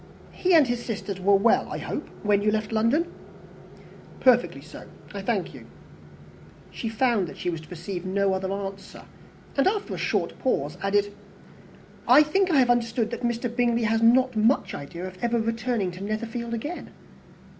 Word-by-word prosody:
He 365 Hz, -1 st, +2 dB
and 310 Hz, -3 st, +7 dB
his 240 Hz, -1 st, -2 dB
sisters 200 Hz, -4 st, -4 dB
were 200 Hz, +2 st, +4 dB
well, 195 Hz, -, +3 dB
I -, -, -3 dB
hope, -, -, -5 dB
when 205 Hz, -1 st, +3 dB
you 210 Hz, -, +2 dB
left 215 Hz, 0 st, -1 dB
London?" 230 Hz, +10 st, +1 dB, 1.1 s
"Perfectly 250 Hz, -2 st, +3 dB
so, -, -, -11 dB, 0.3 s
I -, -, -5 dB
thank -, -, -1 dB
you." -, -, -12 dB, 1.0 s
She 225 Hz, -, -4 dB
found 225 Hz, -4 st, +1 dB
that -, -, -10 dB
she 180 Hz, -, -2 dB
was 165 Hz, -2 st, -5 dB
to 155 Hz, -, -16 dB
receive 175 Hz, +1 st, -6 dB
no 195 Hz, +1 st, +1 dB
other 190 Hz, 0 st, -2 dB
answer; 195 Hz, 0 st, -6 dB, 0.5 s
and, 275 Hz, -, +3 dB
after 410 Hz, +1 st, -1 dB
a -, -, -5 dB
short -, -, -1 dB
pause, 150 Hz, -, -1 dB
added, 205 Hz, +1 st, +1 dB, 0.9 s
"I 300 Hz, -, +8 dB
think 375 Hz, +6 st, +1 dB
I 320 Hz, -, +3 dB
have 250 Hz, -2 st, +5 dB
understood 230 Hz, -1 st, 0 dB
that 235 Hz, -, -5 dB
Mr. 235 Hz, 0 st, -2 dB
Bingley 235 Hz, -1 st, +2 dB
has 225 Hz, +1 st, +1 dB
not 255 Hz, +2 st, +4 dB
much 220 Hz, +5 st, +2 dB
idea 170 Hz, +5 st, -7 dB
of 185 Hz, 0 st, -9 dB
ever 235 Hz, 0 st, +1 dB
returning 225 Hz, -3 st, -1 dB
to 185 Hz, +2 st, -8 dB
Netherfield 230 Hz, +3 st, -3 dB
again?" 295 Hz, +10 st, -6 dB
225 Hz, 175 wpm, -25 LUFS, 195-245 Hz, 1.1 s, I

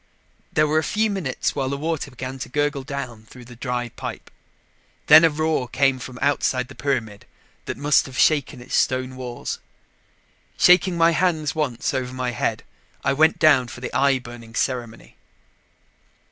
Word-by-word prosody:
There 155 Hz, -, +3 dB
were 155 Hz, +1 st, +2 dB
a -, -, -2 dB
few 215 Hz, +4 st, 0 dB
minutes 175 Hz, -10 st, -2 dB
while 135 Hz, -2 st, -2 dB
the 140 Hz, -, -2 dB
water 160 Hz, -1 st, -3 dB
began 130 Hz, +1 st, -7 dB
to -, -, -6 dB
gurgle 145 Hz, +1 st, 0 dB
down 130 Hz, -5 st, -6 dB
through 125 Hz, -1 st, -13 dB
the 120 Hz, 0 st, -12 dB
dry 125 Hz, 0 st, -3 dB
pipe. -, -, -8 dB, 0.7 s
Then 160 Hz, -, +9 dB
a 165 Hz, -, +6 dB
roar 155 Hz, -3 st, -1 dB
came 135 Hz, +1 st, +1 dB
from 125 Hz, 0 st, -8 dB
outside 130 Hz, -3 st, +1 dB
the -, -, -10 dB
pyramid 115 Hz, -9 st, -3 dB, 0.4 s
that -, -, -5 dB
must 145 Hz, 0 st, +3 dB
have 130 Hz, -1 st, -9 dB
shaken 140 Hz, -4 st, +2 dB
its 125 Hz, -, -10 dB
stone 130 Hz, 0 st, +1 dB
walls. 125 Hz, -2 st, -5 dB, 1.0 s
Shaking 180 Hz, 0 st, +5 dB
my 165 Hz, 0 st, +5 dB
hands 160 Hz, -2 st, 0 dB
once 145 Hz, -7 st, -2 dB
over 130 Hz, -1 st, -3 dB
my 125 Hz, -1 st, -2 dB
head, 120 Hz, -, -2 dB, 0.4 s
I 140 Hz, -, +2 dB
went 155 Hz, +3 st, +3 dB
down 145 Hz, -6 st, +4 dB
for 120 Hz, -, -9 dB
the 125 Hz, -, -6 dB
eye 140 Hz, -1 st, +3 dB
burning 120 Hz, -2 st, -11 dB
ceremony. 120 Hz, -3 st, -3 dB
135 Hz, 170 wpm, -22 LUFS, 125-150 Hz, 1.0 s, Then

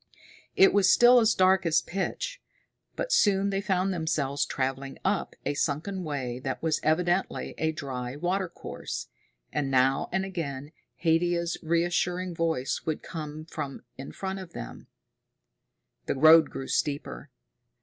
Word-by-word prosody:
It 195 Hz, -, +6 dB
was 195 Hz, -2 st, +5 dB
still 245 Hz, +1 st, +7 dB
as 225 Hz, -1 st, +3 dB
dark 185 Hz, 0 st, +4 dB
as 165 Hz, -2 st, +2 dB
pitch, -, -, -4 dB, 0.5 s
but -, -, -3 dB
soon 200 Hz, -1 st, +3 dB
they 195 Hz, 0 st, -1 dB
found 190 Hz, -1 st, 0 dB
themselves 145 Hz, -5 st, -1 dB
traveling 135 Hz, +1 st, -3 dB
up -, -, 0 dB
a -, -, 0 dB
sunken 165 Hz, +7 st, -2 dB
way 130 Hz, -6 st, -3 dB
that 130 Hz, 0 st, -4 dB
was 160 Hz, -1 st, +1 dB
evidently 175 Hz, +4 st, 0 dB
a 160 Hz, 0 st, +1 dB
dry 130 Hz, -5 st, -5 dB
watercourse. 180 Hz, +3 st, -4 dB, 0.4 s
And 140 Hz, -2 st, -1 dB
now 135 Hz, +1 st, +2 dB
and 190 Hz, +1 st, 0 dB
again 150 Hz, -7 st, -5 dB, 0.3 s
Haidia's 170 Hz, +1 st, +2 dB
reassuring 175 Hz, +2 st, 0 dB
voice 160 Hz, -6 st, -1 dB
would 155 Hz, -1 st, -3 dB
come 155 Hz, -2 st, -7 dB
from 145 Hz, -5 st, -6 dB
in 135 Hz, -, -8 dB
front 190 Hz, 0 st, -4 dB
of 185 Hz, -3 st, -10 dB
them. -, -, -8 dB, 1.2 s
The -, -, 0 dB
road 155 Hz, +2 st, +7 dB
grew 135 Hz, -, -6 dB
steeper. 145 Hz, -1 st, -2 dB
165 Hz, 140 wpm, -27 LUFS, 145-190 Hz, 1.2 s, still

